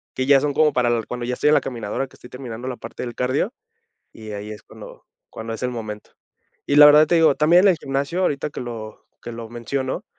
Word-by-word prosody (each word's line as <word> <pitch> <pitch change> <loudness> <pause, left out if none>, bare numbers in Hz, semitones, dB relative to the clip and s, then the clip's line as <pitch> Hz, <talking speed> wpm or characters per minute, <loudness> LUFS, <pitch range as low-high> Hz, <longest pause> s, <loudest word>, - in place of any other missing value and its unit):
que 130 - -1
ya 140 0 +6
son 145 0 -1
como 155 -1 +3
para 125 -1 +2
l 120 -1 0
cuando 125 0 -5
ya 125 +1 -2
estoy 150 - +2
en - - +5
la - - +4
caminadora, 120 +1 -4
que - - -20
estoy 125 - -15
terminando 125 -1 -7
la 125 - -4
parte - - -8
del 120 -1 -5
cardio, 130 - -1 0.6
y 110 -1 -11
ahí 105 +1 -6
es 105 - -9
cuando - - -13 0.3
cuando 115 0 -6
es 115 - -6
el 125 - -1
momento. 110 -3 -7 0.6
Y, 145 - +1
la 150 - +10
verdad, 150 +1 +7
te 175 - +2
digo, 160 -3 +5
también 170 +4 +5
en 200 - +7
el 175 - +2
gimnasio, 140 +6 -2
ahorita 150 -4 0
que - - -6
lo 115 -3 -8 0.2
que 120 - -6
lo 115 -1 -8
menciono, 130 +3 -4
125 Hz, 245 wpm, -22 LUFS, 115-145 Hz, 0.6 s, la